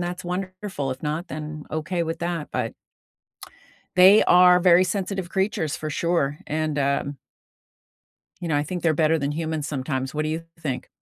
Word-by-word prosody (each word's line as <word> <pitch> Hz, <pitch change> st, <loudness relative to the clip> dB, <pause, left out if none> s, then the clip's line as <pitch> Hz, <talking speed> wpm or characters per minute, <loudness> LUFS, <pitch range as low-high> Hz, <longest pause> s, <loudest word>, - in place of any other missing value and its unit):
that's 175 Hz, 0 st, -4 dB
wonderful, 185 Hz, -4 st, -4 dB
if 130 Hz, -, -6 dB
not, 155 Hz, +4 st, -3 dB
then 155 Hz, 0 st, -6 dB
okay 165 Hz, +3 st, -2 dB
with 165 Hz, 0 st, -3 dB
that 170 Hz, -3 st, -3 dB
but -, -, -2 dB, 1.2 s
they 190 Hz, +4 st, +8 dB
are 180 Hz, 0 st, +6 dB
very 180 Hz, 0 st, +6 dB
sensitive 190 Hz, -1 st, -3 dB
creatures 190 Hz, -5 st, -1 dB
for 155 Hz, -, -5 dB
sure 150 Hz, -3 st, 0 dB
and, 155 Hz, -1 st, -1 dB
um 140 Hz, 0 st, 0 dB, 1.2 s
you 175 Hz, -2 st, -5 dB
know, 150 Hz, -, +1 dB
I 145 Hz, -, +2 dB
think 175 Hz, +3 st, -5 dB
they're 160 Hz, -2 st, +3 dB
better 160 Hz, +1 st, +3 dB
than 140 Hz, 0 st, -1 dB
humans 160 Hz, -1 st, -3 dB
sometimes, 135 Hz, -2 st, -3 dB
what 155 Hz, -, 0 dB
do 155 Hz, -, -2 dB
you 160 Hz, +2 st, -3 dB, 0.2 s
think? 140 Hz, -6 st, -4 dB
160 Hz, 170 wpm, -24 LUFS, 150-180 Hz, 1.2 s, they